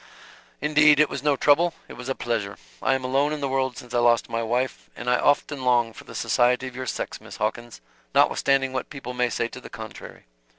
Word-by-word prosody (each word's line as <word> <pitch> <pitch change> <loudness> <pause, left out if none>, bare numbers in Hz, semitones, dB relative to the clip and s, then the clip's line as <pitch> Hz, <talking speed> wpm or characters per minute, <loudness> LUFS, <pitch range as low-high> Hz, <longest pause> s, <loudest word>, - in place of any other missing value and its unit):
"Indeed 150 0 +5
it 150 - +5
was 135 - -4
no 145 -1 +2
trouble. 160 +5 +3
It - - -10
was 125 +1 -8
a 135 - -1
pleasure. 105 -4 -3 0.2
I 135 - +2
am 130 - -3
alone 135 +3 +1
in 155 - -3
the 140 - -1
world 130 -2 -1
since 120 0 -10
I 120 - +2
lost 120 -1 +3
my 115 0 -1
wife, 120 +3 -2
and 120 - -8
I 125 0 +3
often 145 -1 +1
long 120 -2 +2
for - - -12
the - - -11
society 125 +2 +2
of 130 -1 -7
your 130 0 -5
sex, - - -4
Miss - - -10
Hawkins, 110 - -3 0.3
notwithstanding 135 -1 +3
what 130 - -3
people 135 -4 -7
may 125 0 +1
say 120 - -1
to 125 - -10
the - - -11
contrary." 110 -1 -10
130 Hz, 225 wpm, -24 LUFS, 120-140 Hz, 0.3 s, Indeed